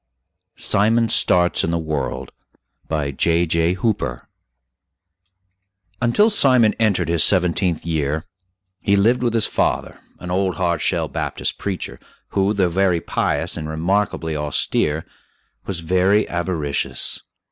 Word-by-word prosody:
SIMON 115 +3 +2
STARTS 90 -4 +2
IN - - 0
THE 85 - 0
WORLD 80 -4 -3 0.6
BY 75 -3 -2
J.J. 85 +3 +1
HOOPER 95 - -2 1.7
Until 205 - +3
Simon 130 - +4
entered 100 -7 +1
his 85 -1 +3
seventeenth 90 -2 +2
year 80 -2 -1 0.5
he 100 - +1
lived 115 +6 +3
with 120 -2 0
his 115 - +4
father, - - -1 0.2
an 90 - -7
old 95 -1 0
"hard 85 -2 -1
shell" - - +1
Baptist - - -3
preacher, 95 -3 -4 0.3
who, 100 0 +1
though 95 -2 +2
very 90 0 +1
pious - - -1
and 75 0 -5
remarkably 80 0 -1
austere, 75 +1 -1 0.6
was 90 -4 -3
very 95 +5 +2
avaricious. 85 -5 -2
90 Hz, 120 wpm, -20 LUFS, 80-100 Hz, 1.7 s, Simon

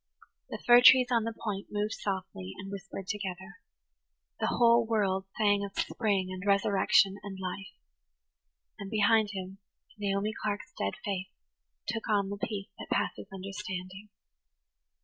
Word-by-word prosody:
The - - -4
fir 240 0 +8
trees 250 0 +8
on 230 -2 +2
the 230 - -1
point 200 -3 -3
moved 210 +1 -1
softly 185 - -4
and 195 +1 -7
whispered 195 -1 -7
together. 190 -2 -5 0.8
The - - +1
whole 235 0 +5
world 195 -4 0
sang 205 -2 +3
of 200 -1 -7
spring 200 -5 0
and 185 0 -6
resurrection 200 0 +3
and 195 -1 -7
life; 190 +1 -5 1.1
and 200 - -6
behind 215 0 +3
him 190 0 -6 0.4
Naomi 200 +1 0
Clark's 205 -1 -3
dead 100 - -1
face 195 -1 -2 0.6
took 225 -1 -3
on 200 -2 +2
the 205 - -4
peace 200 -1 -4
that - - -8
passes - - -1
understanding. 195 0 -6
200 Hz, 140 wpm, -30 LUFS, 190-210 Hz, 1.1 s, fir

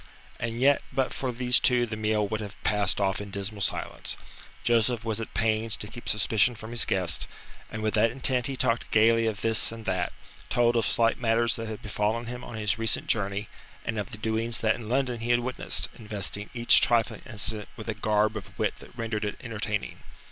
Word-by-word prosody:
And 115 0 -3
yet 140 +2 +4
but 135 -2 0
for 130 -2 -2
these 125 +1 +4
two 125 -1 +4
the 110 - -5
meal 105 -1 +1
would 110 +1 -3
have 100 -2 -7
passed 105 -3 +2
off 100 0 0
in 100 - -7
dismal 100 +1 -4
silence. - - -2 0.5
Joseph 115 0 +2
was 110 0 0
at 115 - -7
pains 110 0 +1
to - - -3
keep 120 - -7
suspicion 110 +3 +3
from 110 +1 -9
his 120 0 +3
guest, 90 -5 -1 0.4
and 110 0 -5
with 110 - 0
that 115 +1 +4
intent 125 0 +1
he 135 -1 -4
talked 115 -1 0
gaily 115 +1 +4
of 105 -2 -2
this 110 -1 +4
and 115 -1 -9
that, 90 -2 0 0.4
told 120 0 +3
of 115 -2 +2
slight 115 -1 +2
matters 115 0 +2
that 115 -1 -5
had 110 -1 -7
befallen 105 +2 -1
him 125 +1 -6
on 120 - -8
his 105 0 0
recent 115 0 +2
journey 100 -1 -1 0.4
and 110 -2 -2
of 100 - -4
the - - -7
doings 110 +2 -1
that 110 -1 +3
in 110 -2 -8
London 125 -1 0
he 115 +1 -4
had 120 0 +4
witnessed, 130 +1 -1
investing 105 -1 -3
each 120 0 +7
trifling 115 -2 +2
incident 105 -1 -2
with 110 - -8
a 110 - -1
garb 105 +1 +1
of 100 -2 -8
wit 110 - +1
that - - -15
rendered 115 -2 -2
it 105 - -2
entertaining. 110 -3 -3
110 Hz, 210 wpm, -27 LUFS, 105-120 Hz, 0.5 s, each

